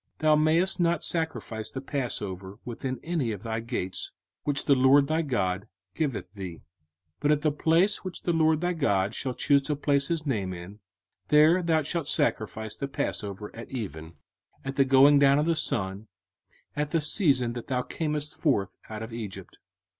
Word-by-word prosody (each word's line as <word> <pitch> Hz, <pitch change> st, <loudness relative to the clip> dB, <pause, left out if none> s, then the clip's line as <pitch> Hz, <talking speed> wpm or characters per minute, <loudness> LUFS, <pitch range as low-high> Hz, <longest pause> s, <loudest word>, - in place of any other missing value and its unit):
05:016:005 -, -, -48 dB
Thou 155 Hz, -1 st, +4 dB
mayest 165 Hz, +5 st, +3 dB
not 170 Hz, -2 st, +2 dB
sacrifice 160 Hz, -10 st, -2 dB
the 130 Hz, -, -5 dB
passover 105 Hz, -9 st, -4 dB
within 125 Hz, +1 st, -4 dB
any 160 Hz, -9 st, -1 dB
of 105 Hz, -2 st, -6 dB
thy 110 Hz, -1 st, -2 dB
gates, 110 Hz, -5 st, -3 dB, 0.3 s
which 145 Hz, -1 st, -1 dB
the 140 Hz, -, +5 dB
LORD 135 Hz, +2 st, +5 dB
thy 155 Hz, +3 st, +1 dB
God 100 Hz, -, -1 dB, 0.3 s
giveth 135 Hz, -, -3 dB
thee: 95 Hz, -4 st, -6 dB
05:016:006 -, -, -19 dB, 0.6 s
But 145 Hz, +1 st, +2 dB
at 150 Hz, -1 st, +2 dB
the 155 Hz, 0 st, +2 dB
place 165 Hz, +7 st, +2 dB
which 185 Hz, -2 st, -7 dB
the 175 Hz, -, +1 dB
LORD 160 Hz, -1 st, +3 dB
thy 180 Hz, 0 st, +1 dB
God 100 Hz, -, +1 dB
shall 130 Hz, +1 st, -3 dB
choose 140 Hz, +2 st, +3 dB
to 145 Hz, +2 st, -2 dB
place 140 Hz, -1 st, +1 dB
his 165 Hz, -2 st, -2 dB
name 100 Hz, -9 st, -1 dB
in, 90 Hz, +4 st, -10 dB, 0.5 s
there 155 Hz, +4 st, +5 dB
thou 160 Hz, -2 st, +2 dB
shalt 155 Hz, +1 st, -2 dB
sacrifice 110 Hz, -8 st, -1 dB
the 140 Hz, -, -4 dB
passover 105 Hz, -6 st, -4 dB
at 115 Hz, -, -9 dB
even, 85 Hz, -, -6 dB, 0.5 s
at 135 Hz, 0 st, -4 dB
the 135 Hz, -, +4 dB
going 135 Hz, +2 st, +6 dB
down 140 Hz, 0 st, +5 dB
of 150 Hz, -, +2 dB
the 165 Hz, 0 st, +2 dB
sun, 100 Hz, -, -2 dB, 0.7 s
at 150 Hz, 0 st, -1 dB
the 165 Hz, -, +1 dB
season 140 Hz, -, +2 dB
that 120 Hz, -1 st, -7 dB
thou 125 Hz, -2 st, 0 dB
camest 150 Hz, 0 st, -3 dB
forth 100 Hz, -, 0 dB
out 110 Hz, 0 st, -5 dB
of 110 Hz, +1 st, -8 dB
Egypt. 100 Hz, -5 st, -7 dB
135 Hz, 185 wpm, -27 LUFS, 110-155 Hz, 0.7 s, going